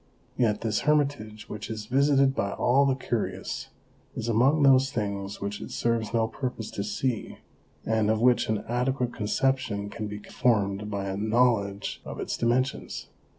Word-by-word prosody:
Yet 110 -4 +1
this 110 -1 0
hermitage, 140 -8 0
which 105 0 -6
is 110 -1 -5
visited 135 +2 +3
by 100 -6 -1
all 135 +3 +3
the 135 - +2
curious, 120 -4 -3 0.5
is 110 - -3
among 130 +7 +3
those 135 0 +5
things 100 -2 -3
which 100 +1 -4
it - - -7
serves 115 -2 -1
no 115 -1 +2
purpose 125 -3 -5
to 100 - -3
see, 110 +3 -2 0.5
and 110 -1 +1
of 110 0 +2
which 120 -1 +3
an 110 -1 0
adequate 125 +1 0
conception 105 -2 0
can 110 -2 -4
be 105 0 -6
formed 105 -2 0
by 100 -2 -3
a 95 0 -3
knowledge 110 -2 +1
of - - -7
its - - -2
dimensions. 130 +3 -1
115 Hz, 160 wpm, -27 LUFS, 105-130 Hz, 0.5 s, those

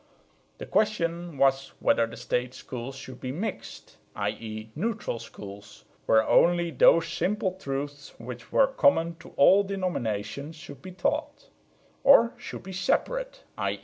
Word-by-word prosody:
The - - -7
question 175 -6 0
was 135 0 +2
whether 115 - +3
the - - -10
State 125 +1 -2
schools 130 +1 -7
should 130 -1 -10
be 130 - -3
"mixed" 185 +11 -6 0.2
i.e. 110 0 -4
neutral 210 - -2
schools, 105 -2 -11 0.2
where 110 0 +4
only 175 -1 +4
those 165 +4 +5
simple 195 +2 -1
truths 145 -5 -6
which 120 0 -9
were 275 - +5
common 165 - +2
to - - -12
all 190 +8 +7
denominations 155 - -3
should 145 -4 -11
be 185 - -9
taught; 295 - -2 0.5
or 235 -4 +7
should 245 - -8
be 190 - -8
"separate" - - -1 0.2
i. - - -1
160 Hz, 140 wpm, -27 LUFS, 125-195 Hz, 0.5 s, all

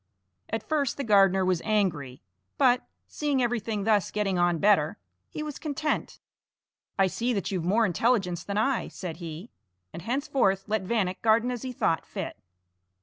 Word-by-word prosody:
At 220 0 -4
first 290 -4 0
the 280 - -2
gardener 195 -4 +4
was 180 -2 +1
angry, 170 - -1 0.3
but, 250 -2 +3 0.2
seeing 290 -3 -1
everything 225 -4 -1
thus 210 -2 +2
getting 195 -3 -1
on 175 -1 +3
better, 175 -5 +3 0.3
he 305 - -5
was 300 -2 -6
content. 305 0 -2 0.8
"I 195 - +5
see 235 +6 -1
that 200 -3 -2
you've 185 -4 -2
more 220 +6 +3
intelligence 185 -3 +1
than 200 0 -3
I," 255 +4 +1
said 175 -4 -7
he, 170 +5 -8 0.4
and - - -7
henceforth 240 - 0
let 215 -2 -1
Vanek 190 -4 -1
garden 230 +2 +3
as 245 -2 -4
he 260 - -4
thought 165 -9 0
fit. - - -5
210 Hz, 160 wpm, -27 LUFS, 185-245 Hz, 0.8 s, I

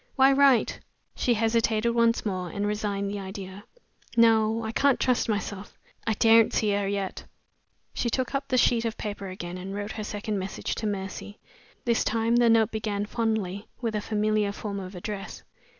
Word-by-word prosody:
"Why 270 0 +6
write?" 275 -3 +4 0.4
She 240 - +1
hesitated 225 0 +2
once 230 -1 +2
more, 185 -3 -2
and 200 +5 -3
resigned 205 -1 -2
the 205 - -4
idea. 195 +1 -8 0.5
"No! 225 -1 +4
I 220 - -3
can't 275 +3 +3
trust 250 -2 +1
myself! 205 -1 -4 0.3
I 220 - +2
daren't 225 +1 +5
see 210 -2 +2
her 200 -1 0
yet!" 200 -1 -3 0.7
She 240 - -1
took 255 +3 -1
up 275 0 -2
the 255 - +1
sheet 235 -1 +3
of 230 -1 -3
paper 205 -2 -5
again, 180 -1 -6
and 195 +2 -6
wrote 205 +1 -4
her 215 - -5
second 210 0 -3
message 190 +1 -4
to 220 - -3
Mercy. 200 +1 -5 0.5
This 235 -1 +2
time 230 +1 +1
the 240 -1 +5
note 225 -2 +4
began 210 -2 -2
fondly 215 -3 -2
with 230 -3 -2
a 210 - 0
familiar 215 -1 0
form 200 -1 -5
of 185 0 -8
address. 195 +2 -6
215 Hz, 180 wpm, -27 LUFS, 200-230 Hz, 0.7 s, Why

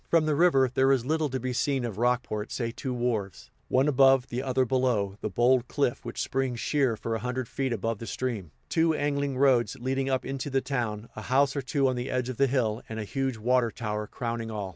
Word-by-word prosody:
From 165 -2 +4
the 155 - +2
river, 145 -4 +4
there 135 +1 +4
is 130 -3 +2
little 155 +1 0
to 130 0 -2
be 130 0 -3
seen 135 0 0
of 110 -3 -5
Rockport 120 -3 0
save 115 -2 -3
two 130 - -4
wharves, 115 -7 -2 0.2
one 130 +3 +3
above, 135 -2 +4
the 120 +1 -2
other 130 -1 +1
below, 120 -6 +1
the - - -2
bold 120 +4 +3
cliff 140 -4 -1
which 120 - -4
springs 130 -3 -1
sheer 135 -6 +1
for 115 - -3
a 115 - -1
hundred 125 0 -3
feet 135 +1 -2
above 115 -1 -2
the 115 - -7
stream, 115 -9 -3 0.2
two 160 -1 +2
angling 140 -2 -1
roads 130 -2 +3
leading 135 +2 -1
up 130 -1 0
into 135 +1 -4
the 135 -1 +2
town, 115 -5 -3
a 110 - -6
house 135 +4 +2
or 140 - -1
two 135 +1 +1
on 130 - 0
the 125 +1 -3
edge 125 0 -1
of 130 - -5
the 140 - +4
hill 120 -4 0
and 110 0 -5
a - - -2
huge 135 +3 -2
water 120 +2 +2
tower 105 -2 -4
crowning 115 -1 -4
all. 105 -3 -4
125 Hz, 230 wpm, -28 LUFS, 115-135 Hz, 0.2 s, From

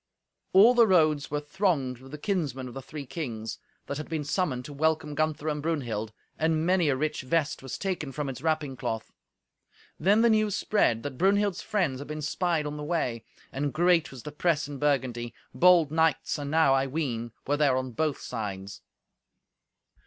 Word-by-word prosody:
All 210 +6 +7
the 235 -2 +6
roads 155 -6 +3
were 150 - -1
thronged 150 - -1
with 135 +1 -13
the 150 - -6
kinsmen 145 - -2
of 125 - -9
the 135 - -6
three 145 +1 -8
kings, 115 -6 -5 0.3
that 140 - -4
had 155 - -7
been 160 -2 -2
summoned 145 -5 -1
to 145 - -8
welcome 155 0 0
Gunther 155 0 -1
and 150 -1 -1
Brunhild, 120 -9 -2 0.3
and 160 0 +1
many 180 -3 +3
a 135 - +2
rich 155 +3 -2
vest 145 +3 0
was 135 -1 -6
taken 180 -8 -3
from 145 +1 -3
its 130 -1 -6
wrapping 155 -4 -1
cloth. 115 -2 -4 0.9
Then 200 +7 +4
the 235 - +5
news 215 -2 +2
spread, 115 - +1
that 130 -3 -6
Brunhild's 200 0 +2
friends 180 -12 -1
had 145 - -7
been 150 0 -5
spied 165 +1 0
on 150 0 -4
the 150 - -5
way. 140 -8 -1 0.3
And 140 +1 -2
great 175 +1 +3
was 130 -3 -11
the 150 - -6
press 150 -1 0
in 145 -2 -7
Burgundy. 130 -5 0 0.2
Bold 175 -4 +5
knights, 160 -2 +1
enow, 145 0 +3
I 135 0 +2
ween, 125 -6 -3
were 145 +1 +1
there 140 -4 +3
on 130 -1 -3
both 150 +4 -1
sides! 100 -4 -5
150 Hz, 185 wpm, -28 LUFS, 130-165 Hz, 0.9 s, All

